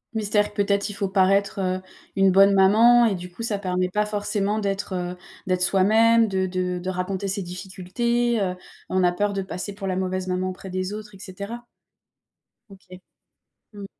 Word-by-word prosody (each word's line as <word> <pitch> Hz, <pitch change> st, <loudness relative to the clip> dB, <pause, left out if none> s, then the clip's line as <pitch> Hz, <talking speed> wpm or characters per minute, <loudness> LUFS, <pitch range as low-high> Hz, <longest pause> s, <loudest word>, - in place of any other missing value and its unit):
Mystère 210 Hz, -1 st, 0 dB
peut-être 200 Hz, 0 st, 0 dB
il -, -, -6 dB
faut 200 Hz, -1 st, -2 dB
paraître, 195 Hz, +2 st, +2 dB
heu, 185 Hz, 0 st, -1 dB, 0.3 s
une 195 Hz, -1 st, +4 dB
bonne 195 Hz, +1 st, +6 dB
maman 225 Hz, +5 st, +6 dB
et 205 Hz, -, 0 dB
du 180 Hz, 0 st, -8 dB
coup 230 Hz, -, -10 dB
ça 225 Hz, -3 st, -1 dB
permet 185 Hz, -2 st, -1 dB
pas 210 Hz, +3 st, 0 dB
forcément 210 Hz, 0 st, -1 dB
d'être, 200 Hz, -1 st, -3 dB
heu, 180 Hz, 0 st, -4 dB, 0.3 s
d'être 185 Hz, -1 st, 0 dB
soi-même, 220 Hz, +4 st, +4 dB
de 190 Hz, -1 st, 0 dB
de 180 Hz, -1 st, -2 dB
de 180 Hz, +1 st, -4 dB
raconter 185 Hz, +2 st, -3 dB
ses 195 Hz, +1 st, -2 dB
difficultés, 195 Hz, +6 st, -2 dB
heu, 185 Hz, -2 st, -1 dB, 0.3 s
on 185 Hz, 0 st, +1 dB
a 175 Hz, -, +4 dB
peur 205 Hz, +3 st, -1 dB
de 195 Hz, -, -2 dB
passer 190 Hz, +1 st, -6 dB
pour 195 Hz, -1 st, -6 dB
la 185 Hz, -, -1 dB
mauvaise 185 Hz, 0 st, -2 dB
maman 185 Hz, 0 st, -1 dB
auprès 185 Hz, +1 st, -8 dB
des 185 Hz, +2 st, -3 dB
autres 210 Hz, -1 st, -8 dB
et -, -, -15 dB
cetera. 200 Hz, +5 st, -8 dB, 1.0 s
OK. 185 Hz, -2 st, -14 dB, 0.7 s
Mmh 205 Hz, -1 st, -8 dB
195 Hz, 185 wpm, -24 LUFS, 185-205 Hz, 1.0 s, bonne